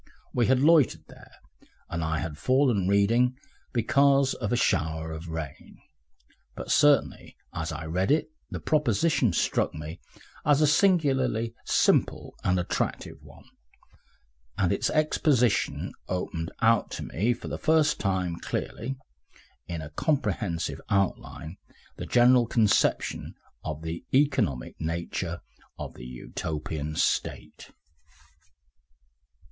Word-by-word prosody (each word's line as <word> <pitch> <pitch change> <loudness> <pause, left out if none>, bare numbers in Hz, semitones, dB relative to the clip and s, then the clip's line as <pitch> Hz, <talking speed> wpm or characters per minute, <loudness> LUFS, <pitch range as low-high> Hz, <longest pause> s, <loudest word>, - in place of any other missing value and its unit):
We 120 -2 +2
had 130 -1 +4
loitered 155 -4 +4
there, - - -15 0.6
and 85 - -3
I 80 0 -1
had 75 0 -4
fallen 120 - +2
reading 115 +6 +3 0.3
because 135 +3 +3
of 105 -4 -4
a - - +3
shower 80 -7 0
of 80 +2 -7
rain.... 80 -4 -7 0.8
But - - -5
certainly 145 0 +3 0.2
as 80 0 -3
I 80 +1 -6
read 90 +4 -1
it 155 +1 +2 0.2
the - - -5
proposition 150 - +2
struck 85 - 0
me 80 +3 -7 0.4
as 145 -1 +4
a 155 - +5
singularly 140 - +2
simple - - +2
and 90 0 +2
attractive 90 - -3
one, - - -16 1.1
and 95 -3 +2
its - - 0
exposition 150 -6 +1
opened 85 -2 -3
out 115 -1 +4
to - - -5
me 105 +8 0
for - - -9
the - - -5
first 155 -2 +3
time 90 -3 -1
clearly, 125 +5 -4 0.7
in 85 -3 -5
a 75 - -9
comprehensive 110 - -1
outline, 95 -3 -2 0.4
the - - -6
general 120 0 +5
conception 110 -3 +1 0.3
of 80 0 -5
the 80 +5 -5
economic 130 - +1
nature 85 +1 -3 0.4
of - - -6
the 60 - -11
Utopian 75 +4 -5
State. - - -2
100 Hz, 120 wpm, -27 LUFS, 80-135 Hz, 1.1 s, a